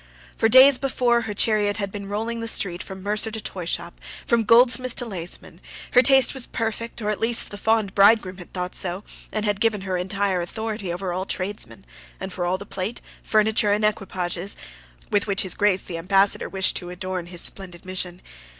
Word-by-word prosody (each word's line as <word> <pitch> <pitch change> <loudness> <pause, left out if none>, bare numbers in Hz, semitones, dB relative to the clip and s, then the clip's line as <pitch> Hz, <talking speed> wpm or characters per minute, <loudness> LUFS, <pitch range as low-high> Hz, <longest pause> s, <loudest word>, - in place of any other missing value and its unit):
For 225 - +2
days 260 +2 +8
before, 245 -3 +1
her 220 -2 -4
chariot 205 -1 +2
had 200 -2 -3
been 200 -1 -7
rolling 225 +3 -3
the 230 - -4
street 180 -5 +1
from 190 -1 -9
mercer 210 +2 +1
to 220 0 -5
toyshop 180 -5 -5 0.3
from 235 -2 +2
goldsmith 245 +2 +4
to 245 - -1
laceman: 180 -6 -4 0.3
her 250 - +6
taste 265 +1 +5
was 265 -3 0
perfect, 230 0 -4
or 210 - 0
at 210 - -4
least 230 +1 +1
the 205 - -7
fond 220 -3 +1
bridegroom 200 -2 +4
had 175 - -12
thought 180 -1 -4
so, 185 +2 -3 0.3
and 215 0 -2
had 205 -1 -1
given 220 -3 +1
her 190 -1 -2
entire 190 0 -1
authority 210 +1 -4
over 180 +1 -3
all 185 +2 -3
tradesmen, 185 - -4 0.3
and 190 - -6
for 175 -1 -2
all 185 +1 0
the 200 - -9
plate, 195 +4 -4 0.2
furniture 215 -1 +2
and 210 +1 +1
equipages, 190 -3 -2 0.5
with 205 0 +1
which 200 -1 0
his 185 - +2
Grace 200 -2 +2
the 170 -2 -6
Ambassador 195 +3 +2
wished 190 -1 +1
to 175 - -7
adorn 180 -1 -5
his 175 -1 -2
splendid 185 -2 -2
mission. 185 -1 -5
200 Hz, 195 wpm, -23 LUFS, 185-225 Hz, 0.5 s, days